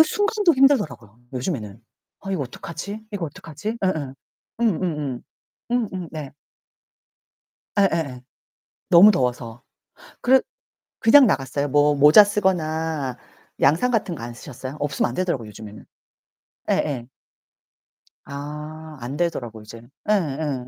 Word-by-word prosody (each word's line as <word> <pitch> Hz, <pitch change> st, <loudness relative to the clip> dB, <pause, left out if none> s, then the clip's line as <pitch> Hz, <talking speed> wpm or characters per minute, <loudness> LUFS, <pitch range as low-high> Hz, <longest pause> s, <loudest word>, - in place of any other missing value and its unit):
그 -, -, +12 dB
순간도 410 Hz, +1 st, +2 dB
힘들더라고요, 160 Hz, -, +2 dB
요즘에는. 120 Hz, -, -4 dB, 0.4 s
'아, 195 Hz, -, -7 dB
이거 185 Hz, -6 st, -1 dB
어떡하지? 170 Hz, -, -7 dB
이거 195 Hz, -4 st, -3 dB
어떡하지?' 165 Hz, +8 st, -6 dB
음음. 155 Hz, -8 st, -1 dB, 0.5 s
음음음. 160 Hz, -, -1 dB, 0.5 s
음음 195 Hz, -8 st, -1 dB
네. 150 Hz, -4 st, -6 dB, 1.5 s
예예예. 165 Hz, -10 st, +1 dB, 0.7 s
너무 185 Hz, +4 st, +9 dB
더워서. 125 Hz, -, -2 dB, 0.6 s
그 265 Hz, +2 st, +5 dB, 0.6 s
그냥 260 Hz, +4 st, +7 dB
나갔어요. 140 Hz, -4 st, 0 dB
뭐 145 Hz, +1 st, +4 dB
모자 150 Hz, +8 st, +8 dB
쓰거나 160 Hz, -9 st, -1 dB, 0.4 s
양산 160 Hz, -, +3 dB
같은 210 Hz, -7 st, 0 dB
거 135 Hz, -, -9 dB
안 120 Hz, 0 st, -6 dB
쓰셨어요? 130 Hz, +2 st, -8 dB
없으면 140 Hz, -3 st, 0 dB
안 -, -, -7 dB
되더라고요 170 Hz, -11 st, -2 dB
요즘에는. 105 Hz, 0 st, -11 dB, 0.9 s
예예. 125 Hz, -6 st, 0 dB, 1.2 s
아 150 Hz, +2 st, -8 dB
안되더라고 125 Hz, -4 st, -3 dB
이젠. 115 Hz, +2 st, -12 dB, 0.2 s
예예. 150 Hz, -9 st, 0 dB
150 Hz, 265 characters per minute, -23 LUFS, 130-190 Hz, 1.5 s, 그